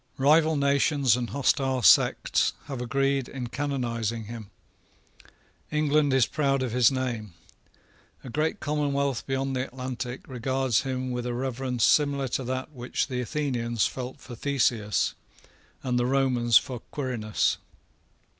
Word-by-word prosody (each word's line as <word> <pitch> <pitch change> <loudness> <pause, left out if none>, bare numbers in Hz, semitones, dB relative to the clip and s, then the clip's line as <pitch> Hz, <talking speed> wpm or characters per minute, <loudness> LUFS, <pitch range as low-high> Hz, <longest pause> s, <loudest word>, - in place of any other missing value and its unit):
Rival 155 +3 +4
nations 140 -2 +3
and 125 -1 -3
hostile 135 -2 +1
sects 90 - +4
have 135 -4 -5
agreed 135 +1 0
in 125 -3 -5
canonising 120 -5 -2
him. 110 -2 -8 1.2
England 150 -1 +2
is 130 -3 +4
proud 140 -2 0
of 125 - -2
his 125 0 +4
name. 120 -8 -3 0.9
A 130 - -8
great 155 +5 -1
commonwealth 140 -4 -1
beyond 135 0 -1
the 130 - 0
Atlantic 130 -1 -6
regards 130 -1 0
him 130 -1 -3
with 125 0 -3
a 120 - -2
reverence 125 -1 -2
similar 140 -1 +3
to 130 - -2
that 130 +4 -3
which 125 0 -3
the 125 -1 -2
Athenians 120 -4 -1
felt 130 +2 -5
for 125 - -10
Theseus, 120 -5 0 0.7
and 125 -2 0
the 120 - +1
Romans 125 -4 +3
for 125 -2 -2
Quirinus. 120 -7 -1
130 Hz, 135 wpm, -27 LUFS, 120-140 Hz, 1.2 s, Rival